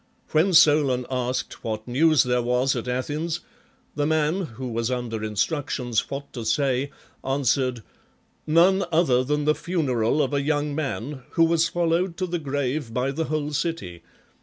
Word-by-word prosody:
When 165 +5 +3
Solon 145 -6 +5
asked 125 0 -3
what 110 0 -4
news 155 +5 +4
there 125 -1 +1
was 125 +3 +1
at 120 0 -4
Athens, 150 +7 -2 0.5
the 145 0 0
man, 160 +3 +1
who 130 - -4
was 115 0 -1
under 120 -3 -3
instructions 120 - -1
what 140 +1 -6
to 120 - -5
say, 130 +4 +1 0.3
answered: 130 -3 0 0.6
"None 180 +5 +4
other 155 -7 +3
than 150 +2 -1
the 150 - +4
funeral 145 -7 0
of - - -2
a 140 - +1
young 145 0 0
man, 135 -2 -4
who 165 - +4
was 165 0 +3
followed 170 +1 0
to 185 - -1
the 175 -1 -3
grave 140 -3 -2
by 130 +2 0
the 160 +4 -2
whole 150 -1 -2
city. 140 - -3
140 Hz, 160 wpm, -24 LUFS, 125-160 Hz, 0.6 s, Solon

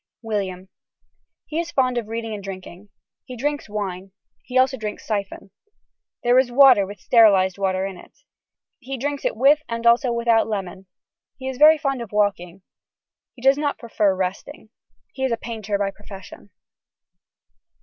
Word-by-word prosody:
(William.) 195 -4 -4 0.8
He 315 - -4
is 340 0 -3
fond 255 -4 +1
of 225 - -8
reading 225 0 -5
and 205 -2 -7
drinking. 190 0 -9 0.3
He 255 -2 -10
drinks 290 0 -3
wine. 195 -2 -5 0.3
He 255 - -3
also 260 +1 +3
drinks 215 -4 -6
siphon. 200 -2 -4 0.7
This 250 +2 +4
is - - -13
water 250 -6 +6
with 200 0 -10
sterilised 195 -3 +4
water 190 -1 0
in 195 -2 -6
it. - - -16 0.7
He 270 +1 -6
drinks 285 +2 -4
it - - 0
with 285 +5 +4
and 230 0 -4
also 240 +2 +4
without 235 -1 +2
lemon. 190 -3 -5 0.5
He 260 - -7
is 265 -1 -5
very 310 +1 +7
fond 275 -4 -2
of 230 - -8
walking. 195 -3 -1 0.7
He 245 - -15
does 270 +2 +4
not 290 -1 -1
prefer 215 -4 0
resting. 195 - -5 0.4
He 265 - -5
is 265 - 0
a 230 - 0
painter 220 -4 -4
by 200 -1 -1
profession. 195 -1 -13
225 Hz, 160 wpm, -22 LUFS, 195-260 Hz, 0.8 s, very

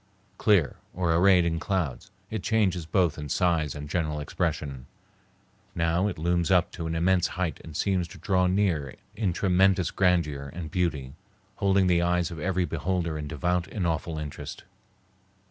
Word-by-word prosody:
Clear, 100 -9 +3 0.2
or 85 -2 +1
arrayed 90 +1 +5
in 80 -1 0
clouds, 95 -2 -2 0.2
it 110 -2 -2
changes 95 -7 +1
both 85 -3 +1
in 75 -1 -6
size 80 -3 +1
and 75 0 -6
general 75 -1 -1
expression. 70 -2 -3 0.9
Now 85 +4 +1
it 100 - -4
looms 85 +2 0
up 90 -2 +3
to 85 -2 -5
an 80 - -2
immense 90 +1 +2
height 85 -6 -2
and 80 -2 -8
seems 95 -3 0
to 80 - -12
draw 90 -2 +1
near 90 -8 0 0.2
in 105 -5 0
tremendous 95 0 +2
grandeur 80 -7 +1
and 80 -4 -6
beauty, 75 -7 -1 0.4
holding 100 -1 +3
the 90 -1 +3
eyes 90 -1 +1
of 85 - -7
every 90 +2 0
beholder 85 +1 -2
in 75 -1 -4
devout 85 +3 -1
and 95 0 -3
awful 80 -1 -1
interest. 75 -1 -7
85 Hz, 165 wpm, -27 LUFS, 80-95 Hz, 0.9 s, arrayed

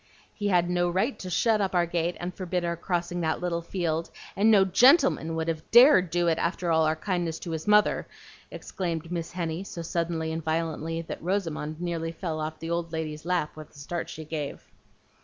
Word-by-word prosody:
"He 205 - -3
had 175 -3 +3
no 175 0 +1
right 195 +10 0
to 185 - -6
shut 215 +4 +2
up 190 -2 -1
our 175 -1 +4
gate 170 0 -1
and 175 +1 -4
forbid 180 -1 -2
our 170 0 -1
crossing 175 0 -2
that 160 -1 0
little 175 -1 -2
field, 165 -2 -2 0.3
and 210 +3 +4
no 200 -3 +6
GENTLEMAN 250 - +4
would 160 0 -2
have 160 -1 -3
DARED 235 - +7
to 175 - -1
do 175 - +2
it 165 -1 +2
after 170 0 -1
all 160 -1 +4
our 155 - +1
kindness 170 -1 -2
to 170 - -7
his 160 +2 -4
mother," 210 0 +4 0.4
exclaimed 170 -3 -4
Miss 170 -2 -3
Henny, 170 0 -3
so 170 -3 -7
suddenly 165 -1 -2
and 160 0 -4
violently 165 0 -2
that - - -7
Rosamond 165 -4 -2
nearly 170 -2 -2
fell 165 -2 -4
off 155 0 -4
the 165 +1 -6
old 170 -1 -2
lady's 155 -1 -4
lap 175 -4 -1
with 155 -1 -11
the - - -17
start 170 +5 -5
she 160 - -8
gave. 150 -2 -5
170 Hz, 210 wpm, -27 LUFS, 160-180 Hz, 0.4 s, DARED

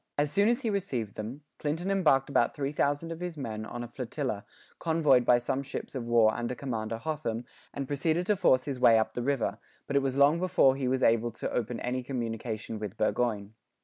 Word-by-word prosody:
As 145 0 +1
soon 200 +4 +3
as 240 +2 +1
he 230 -4 0
received 130 - -2
them, 120 +8 -6 0.2
Clinton 165 +6 -2
embarked 150 -9 +3
about 120 -4 +1
3,000 145 +2 -1
of 165 - -6
his 175 -2 -5
men 110 -5 -5
on 120 0 -5
a - - -6
flotilla, 120 -2 -4 0.3
convoyed 155 -6 +3
by 120 - +6
some 130 +3 -1
ships 140 - -6
of 130 -4 -4
war 115 -2 +5
under 120 +1 -3
Commander 115 -4 -3
Hotham, 125 -4 -3 0.3
and 140 -1 -4
proceeded 160 +5 0
to 210 - +2
force 150 -9 +3
his 135 -3 -4
may 115 -2 +7
up 110 - 0
the 120 - -3
river, 135 -1 -1 0.3
but 140 - -4
it 140 - +5
was 135 -1 -1
long 145 +4 +5
before 160 -7 +4
he 135 -2 -2
was 130 +1 +1
able 115 +1 +3
to - - -4
open 120 0 -2
any 125 +1 -1
communication 115 -3 -4
with 105 -3 -6
Burgoyne. 110 -2 0
130 Hz, 210 wpm, -29 LUFS, 115-150 Hz, 0.3 s, may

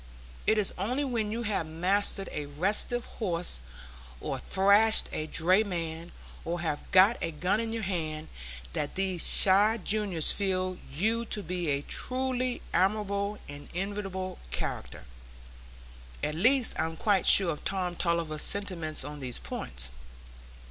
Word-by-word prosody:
It 220 - +5
is 210 -2 +1
only 250 +9 0
when 230 -6 -1
you 235 +2 -2
have 205 -7 -1
mastered 190 +4 0
a 150 -1 -4
restive 200 +10 0
horse, 175 - -3 0.6
or - - -3
thrashed 200 +3 +4
a 155 - -3
drayman, 170 -2 0 0.3
or 170 +1 -3
have 155 -3 -3
got 190 +5 +6
a 165 - -1
gun 180 +6 0
in 225 -1 -2
your 225 -1 -3
hand, 160 -5 -3 0.5
that 145 - -3
these 190 -3 +1
shy 205 +4 +5
juniors 200 -5 +1
feel 185 -2 -1
you 220 +11 +1
to 210 -2 -2
be 175 -2 -2
a 140 0 0
truly 255 - -2
admirable 200 +2 +1
and 145 0 -10
enviable 190 -1 -3
character. 65 - -5 1.2
At 150 - 0
least, 245 - +3
I - - +2
am 165 0 -5
quite 200 -2 +2
sure 190 -4 +7
of 150 - -6
Tom 185 -2 -2
Tulliver's 170 -3 -1
sentiments 175 -8 -1
on 145 +1 -7
these 125 -3 -5
points. 65 0 -3
185 Hz, 140 wpm, -29 LUFS, 165-210 Hz, 1.2 s, sure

